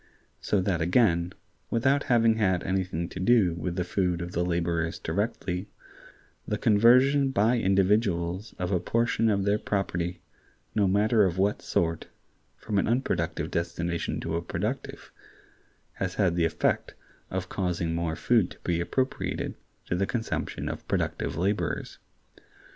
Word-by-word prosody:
So 100 - +1
that 90 -3 0
again, 85 -1 +3 0.4
without 135 +5 +2
having 115 -2 +3
had 95 -5 +1
anything 90 -3 -1
to - - -7
do 95 -3 +4
with 85 +1 -4
the 90 - 0
food 90 -1 0
of 85 - -6
the 85 - 0
laborers 85 -1 -1
directly, 95 +1 -2 0.8
the 105 - -1
conversion 125 +6 +5
by 120 0 +2
individuals 95 -1 +1
of 90 +1 -2
a 90 - +2
portion 115 +2 +1
of 100 -2 +1
their 100 +1 +2
property, 90 -4 -2 0.5
no 105 -3 +2
matter 105 +3 +3
of 95 -2 0
what 100 +2 +1
sort, 85 -1 -1 0.5
from 105 -2 -1
an - - 0
unproductive 120 +4 -1
destination 85 0 -2
to 80 0 -3
a - - -2
productive, 105 +10 -4 0.8
has 95 -1 -3
had 95 -5 +2
the 85 -1 +2
effect 80 - 0 0.3
of 95 0 -3
causing 90 -3 -1
more 85 -1 -1
food 115 -3 +2
to - - -13
be 85 -1 0
appropriated 130 +9 -2 0.3
to - - -1
the 95 +2 0
consumption 115 -3 -3
of - - -6
productive - - -1
laborers. 95 +6 -2
95 Hz, 145 wpm, -27 LUFS, 85-110 Hz, 0.8 s, conversion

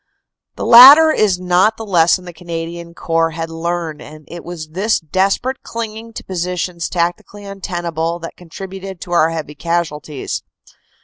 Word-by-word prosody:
The - - -5
latter 280 +7 +10
is 205 -9 +1
not 185 +4 +2
the 225 - -7
lesson 180 -1 +2
the 175 - -9
Canadian 170 0 -7
Corps 165 -1 -1
had 165 0 -4
learned, 165 -2 -4
and 155 0 -13
it 175 0 -8
was 165 -3 -8
this 195 +7 0
desperate 195 - -1
clinging 230 0 -6
to - - -8
positions 180 -1 -3
tacti 175 0 -1
cally 205 0 -12
untenable 175 -4 -4
that 165 -1 -9
contributed 190 +2 -9
to 175 - -8
our 165 -2 +3
heavy 160 -3 -5
casualties. 155 -3 -3
175 Hz, 150 wpm, -17 LUFS, 165-195 Hz, -, latter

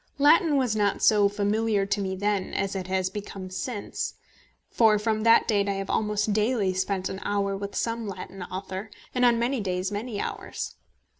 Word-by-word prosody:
Latin 295 +1 +5
was 250 -5 +1
not 205 -2 +1
so 205 -2 +5
familiar 205 0 +1
to 200 +1 -1
me 190 -1 -2
then 205 0 -1
as 195 0 -1
it 185 -1 -3
has 185 0 0
since - - 0
become, 195 -3 -7 1.2
for 220 -2 +4
from 215 +1 0
that 230 +1 +5
date 200 -3 +2
I - - +1
have 195 0 -3
almost 210 0 0
daily 215 -2 +1
spent 190 0 -1
an 190 - -5
hour 200 -1 0
with 200 +1 -6
some 230 -1 -1
Latin 195 0 -7
author, 190 +3 -5 0.2
and 250 - +1
on 240 -1 +5
many 245 +3 0
days 185 -1 -2
many 210 +1 -4
hours. - - -4
205 Hz, 180 wpm, -26 LUFS, 195-220 Hz, 1.2 s, Latin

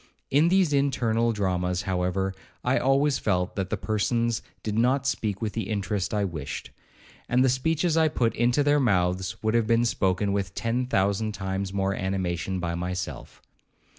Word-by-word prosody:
In 150 +4 +4
these 180 -4 +3
internal 120 -5 +2
dramas, 90 -3 -1
however, 95 0 -1 0.3
I 125 +2 +2
always 135 +1 +2
felt 90 -3 0
that 95 -2 -2
the - - -1
persons 115 +2 0 0.2
did 105 -1 -2
not 125 +4 +2
speak 110 -6 -1
with 105 - -2
the 115 - -3
interest 100 -2 -1
I 105 -1 0
wished; 80 -4 -6 0.6
and 125 +2 +4
the - - +4
speeches 160 +6 +1
I 160 -1 +4
put 120 -7 0
into 120 +4 +2
their 145 +1 +3
mouths 95 -5 +1
would 110 0 +1
have 115 -2 +2
been 115 +1 +3
spoken 100 -2 +1
with 100 -1 -2
ten 120 +2 -1
thousand 100 0 +1
times 95 0 -3
more 95 0 0
animation 95 -1 -2
by 85 -1 -2
myself. 85 -7 -5
105 Hz, 165 wpm, -26 LUFS, 95-125 Hz, 0.6 s, In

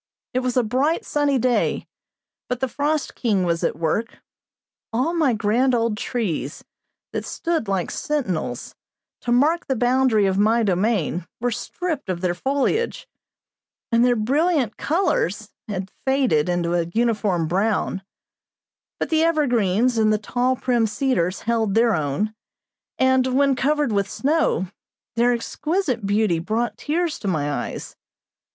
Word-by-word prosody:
It 255 - +2
was 255 -1 -1
a 250 - +4
bright, 265 +9 0
sunny 290 -2 +1
day, 250 0 +1 0.6
but 250 -1 -2
the 265 - 0
frost 295 +4 -1
king 210 -6 0
was 170 -1 0
at - - +1
work; 170 +8 -1 0.7
all 255 +9 0
my 315 -6 +3
grand 230 +4 +2
old 230 -2 +1
trees, 190 - -3 0.5
that - - -3
stood 330 -9 -2
like 190 -3 -1
sentinels, 190 - -3 0.5
to 240 - -3
mark 300 +8 +3
the 265 - 0
boundary 245 -3 +3
of 190 0 +1
my 225 +3 +3
domain, 185 -3 0
were 245 +1 0
stripped 325 - -4
of 175 -2 -2
their 180 -2 +1
foliage, 280 - -1 0.8
and 230 0 +4
their 245 0 +4
brilliant 270 - +1
colors 285 - 0 0.2
had 190 -2 -4
faded 260 - +2
into 175 -1 0
a 170 -1 +1
uniform 210 -8 +1
brown; 195 +2 0 1.0
but - - -2
the 320 0 +3
evergreens 245 - +2
and 215 -1 +4
the 215 - +3
tall, 245 +4 0
prim 240 -3 +1
cedars 210 -6 0
held 225 -3 0
their 230 0 +4
own, 155 +6 -1 0.6
and, 260 0 +3
when 280 -1 +4
covered 290 0 +1
with 200 -1 0
snow, 290 - +1 0.5
their 240 +1 +3
exquisite 255 - -1
beauty 205 -4 +2
brought 220 +8 -1
tears 330 +1 -1
to 205 - -5
my 150 -5 0
eyes. - - -5
235 Hz, 145 wpm, -22 LUFS, 195-265 Hz, 1.0 s, a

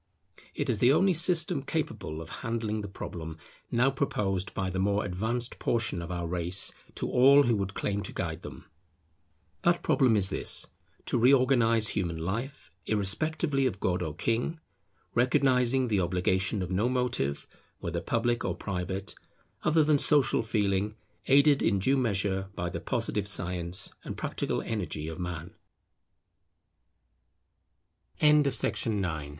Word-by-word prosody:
It 145 - -2
is 115 -5 0
the 125 +4 +5
only 190 +6 +4
system 170 -1 +2
capable 135 - -3
of 80 - -8
handling 115 -2 -2
the 100 - -5
problem 80 -4 -7 0.3
now 125 +3 +3
proposed 100 -8 -1
by 95 -1 -1
the 95 - -2
more 100 +2 +1
advanced 110 +6 -3
portion 115 -7 0
of 85 - -7
our 85 -1 -3
race 85 +2 -1 0.2
to - - -3
all 140 +3 +6
who 120 -4 +2
would 100 0 -3
claim 100 0 -1
to - - -6
guide - - -4
them. - - -10 1.0
That 175 0 +2
problem 130 -6 +3
is 100 -1 +4
this; - - -1 0.4
to - - +1
reorganize 120 -3 +4
human 85 -4 -1
life, 95 - -4 0.2
irrespectively 135 - +1
of 95 - -4
god 90 -2 0
or 80 -1 -3
king; 115 - -1 0.5
recognizing 125 +1 +3
the 105 -4 +1
obligation 95 +3 0
of 90 - -5
no 105 +6 +1
motive, 125 - -1 0.3
whether 85 0 -4
public 120 +5 0
or - - -1
private, 95 0 -4 0.5
other 155 +1 +3
than 150 -1 +3
Social 145 -2 +3
Feeling, 105 -2 0 0.3
aided 140 +1 +5
in 100 - +2
due 115 +9 +2
measure 100 -6 0
by 85 0 -3
the - - -5
positive 105 -1 -2
science 90 -1 -3
and - - -6
practica - - -2
110 Hz, 135 wpm, -29 LUFS, 95-130 Hz, 1.0 s, all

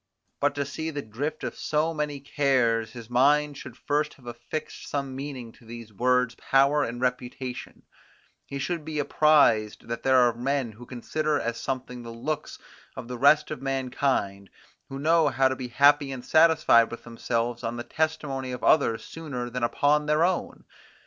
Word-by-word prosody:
But 145 0 +1
to 140 -1 -1
see 160 +3 -4
the 145 -3 -5
drift 130 +9 -5
of - - -3
so 155 +2 0
many 150 -2 -3
cares, 125 -6 +1
his 115 -2 -9
mind 145 +4 +3
should 130 -2 -10
first 150 +1 -1
have 130 - -21
affixed 120 +6 -7
some 140 -2 -3
meaning 135 -4 -6
to - - -22
these 115 -1 -10
words 125 +2 +2
power 140 +4 +2
and 120 -1 -4
reputation; 125 0 -4 0.6
he 140 - -5
should 165 +3 -3
be 155 0 -5
apprised 145 -8 +3
that 115 0 -4
there 130 -1 +4
are 120 -2 +5
men 130 0 -1
who 120 +3 -13
consider 150 +4 -1
as 115 0 -3
something 125 -2 -4
the 115 - -9
looks 145 +7 -4 0.4
of - - -7
the 125 0 -5
rest 150 +3 +4
of 150 - -5
mankind, 130 -7 -1 0.4
who 135 - -6
know 160 +2 +3
how 135 -1 +3
to 130 - -1
be 130 -1 -6
happy 140 +3 +4
and 125 -2 -7
satisfied 160 -8 +5
with 120 - -8
themselves 120 0 -3
on 115 +1 -3
the 120 - -4
testimony 140 -4 -2
of 125 - -6
others 115 -7 +3
sooner 135 -7 -6
than 125 0 -4
upon 145 +5 +2
their 150 +2 +3
own. 180 0 -1
135 Hz, 175 wpm, -26 LUFS, 120-150 Hz, 0.6 s, are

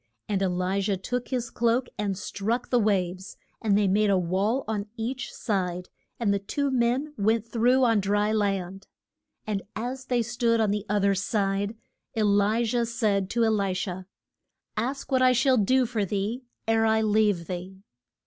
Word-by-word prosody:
And 200 -2 -1
E 195 - +2
li 185 +2 0
jah 195 -1 0
took 245 +6 -3
his 245 -3 -3
cloak 235 +2 +1
and 205 -3 -2
struck 220 +5 -3
the 245 - +4
waves, 190 -3 -1 0.2
and 205 -3 +3
they 205 -1 +3
made 205 +2 +3
a 195 - +4
wall 195 +8 0
on 210 -1 -2
each 245 +3 -4
side, 180 -4 -2 0.3
and 215 -4 +2
the 200 - 0
two 280 +8 -2
men 255 +4 +1
went 220 +2 +2
through 245 +3 +3
on 230 -3 +4
dry 205 +2 +1
land. 195 -3 -1 0.6
And 205 -2 -2
as 255 +4 -4
they 245 -2 +1
stood 235 0 +1
on 215 -2 +2
the 205 0 -2
oth 205 -1 +1
er 200 - +4
side, 200 +2 -1 0.4
E 220 - +2
li 205 +3 +3
jah 235 +1 +1
said 210 -5 0
to 235 +1 +1
E - - +3
li 200 -3 0
sha, 185 -1 -4 0.7
Ask 265 +5 -3
what 260 -1 +3
I 255 0 +5
shall 255 +2 +3
do 255 +5 +3
for 225 -3 -1
thee, 205 +5 -2 0.3
ere 225 0 +3
I 220 0 +3
leave 210 -5 +2
thee. 185 +2 -7
215 Hz, 185 wpm, -26 LUFS, 195-235 Hz, 0.7 s, I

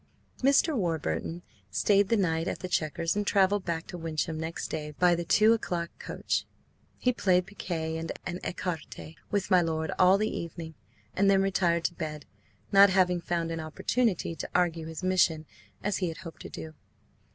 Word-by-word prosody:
Mr. 280 +4 +4
Warburton 170 - -2 0.3
stayed 200 - +3
the 230 - +3
night 165 -4 0
at - - -2
the 185 - -3
Chequers 165 0 -1
and 205 -1 -1
travelled 200 0 +3
back 165 -1 -2
to 180 - -8
Wyncham 160 0 -2
next 160 +1 -4
day 150 -1 -5
by 180 -1 +5
the 170 0 -1
two 215 +6 +5
o'clock 175 -6 -2
coach. - - -2 0.5
He 250 - +1
played 180 -5 +2
piquet 160 -5 -4
and 165 0 -4 0.3
écarté 165 -3 -5 0.2
with 205 -1 -1
my 180 -1 +6
lord 160 -1 -1
all 185 +1 +6
the 215 +1 -1
evening, 165 -1 -6 0.4
and 200 +1 +3
then 195 -1 +4
retired 175 -3 +1
to 175 - 0
bed, 155 -4 -5 0.5
not 200 0 +8
having 180 -2 +2
found 170 -1 -2
an 165 - -3
opportunity 175 +5 0
to - - -5
argue 170 -3 +1
his 160 +2 -7
mission 175 -4 +2 0.4
as 205 0 0
he 185 - -1
had 165 - -5
hoped 165 -2 -10
to - - -8
do. 160 0 -8
175 Hz, 175 wpm, -28 LUFS, 160-195 Hz, 0.5 s, not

